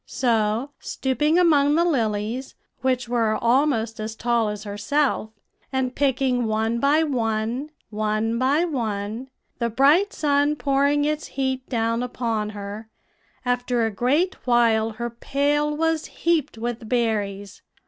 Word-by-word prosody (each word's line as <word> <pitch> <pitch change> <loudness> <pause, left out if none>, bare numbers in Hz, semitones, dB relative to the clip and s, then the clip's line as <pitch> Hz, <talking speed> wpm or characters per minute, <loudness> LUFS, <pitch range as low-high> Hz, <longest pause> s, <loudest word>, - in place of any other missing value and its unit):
"So, 230 +1 0
stooping 295 +5 0
among 295 -5 +4
the 340 +1 +3
lilies, 230 -3 -1 0.3
which 255 -1 0
were 230 -2 +1
almost 235 -3 +1
as 220 +1 -4
tall 235 -2 +1
as 210 0 -5
herself, 220 +4 0 0.4
and 260 -1 -1
picking 260 -3 +1
one 220 +2 0
by 290 +5 +3
one, 235 0 -1 0.2
one 215 +2 -1
by 280 +6 +2
one, 225 -4 -3 0.3
the 235 -1 0
bright 290 - +4
sun 290 0 +1
pouring 285 +1 +2
its 305 0 -1
heat 265 -1 -3
down 230 -1 0
upon 230 -4 -2
her, 205 +2 -7 0.6
after 245 -1 +1
a 225 - -1
great 285 - +1
while 230 -2 +3
her 235 +2 -4
pail 290 +5 0
was 325 0 0
heaped 325 -8 -1
with 230 -1 -4
berries. 205 -4 -1
245 Hz, 130 wpm, -23 LUFS, 220-285 Hz, 0.6 s, among